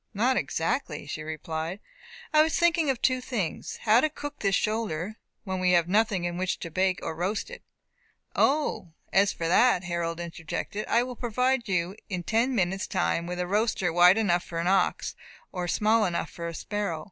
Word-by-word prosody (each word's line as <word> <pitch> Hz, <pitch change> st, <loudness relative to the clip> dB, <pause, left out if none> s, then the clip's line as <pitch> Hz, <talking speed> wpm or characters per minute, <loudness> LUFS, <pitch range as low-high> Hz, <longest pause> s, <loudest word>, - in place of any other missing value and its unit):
"Not 245 Hz, +6 st, +2 dB
exactly," 160 Hz, -, -1 dB
she 150 Hz, +1 st, -5 dB
replied; 160 Hz, +3 st, -4 dB, 0.5 s
"I 305 Hz, -, +7 dB
was 315 Hz, +1 st, +2 dB
thinking 335 Hz, -3 st, +3 dB
of 260 Hz, -3 st, -1 dB
two 255 Hz, -1 st, +3 dB
things; 220 Hz, -10 st, -3 dB
how 225 Hz, +2 st, +5 dB
to 310 Hz, -, +2 dB
cook 290 Hz, -1 st, -7 dB
this 195 Hz, -1 st, +2 dB
shoulder, 215 Hz, -3 st, -2 dB, 0.3 s
when 190 Hz, -2 st, -3 dB
we 180 Hz, 0 st, +3 dB
have 170 Hz, -1 st, +4 dB
nothing 205 Hz, -1 st, +2 dB
in 175 Hz, 0 st, -3 dB
which 185 Hz, 0 st, -1 dB
to 170 Hz, -, -6 dB
bake 185 Hz, +2 st, +1 dB
or -, -, -3 dB
roast 195 Hz, -, -2 dB
it -, -, -9 dB, 0.4 s
" -, -, -41 dB
"O, 280 Hz, -, -2 dB, 0.2 s
as 195 Hz, +1 st, +4 dB
for 165 Hz, -, -3 dB
that," 190 Hz, +2 st, +4 dB
Harold 170 Hz, -1 st, -2 dB
interjected, 170 Hz, +4 st, -5 dB
"I 235 Hz, +1 st, +3 dB
will 250 Hz, 0 st, -6 dB
provide 250 Hz, +1 st, 0 dB
you 180 Hz, 0 st, 0 dB
in 185 Hz, -3 st, -3 dB
ten 235 Hz, +7 st, +1 dB
minutes' 190 Hz, -1 st, 0 dB
time 170 Hz, 0 st, 0 dB
with 180 Hz, 0 st, -4 dB
a 180 Hz, -, 0 dB
roaster 195 Hz, -3 st, 0 dB
wide 175 Hz, +3 st, +7 dB
enough 180 Hz, -6 st, +2 dB
for 170 Hz, -, -7 dB
an 165 Hz, -, -1 dB
ox, 190 Hz, 0 st, +1 dB, 0.4 s
or 180 Hz, -2 st, -3 dB
small 215 Hz, +4 st, +3 dB
enough 170 Hz, -1 st, -2 dB
for 170 Hz, 0 st, -6 dB
a 165 Hz, -, -5 dB
sparrow. 205 Hz, -5 st, -3 dB
190 Hz, 195 wpm, -27 LUFS, 170-230 Hz, 0.5 s, I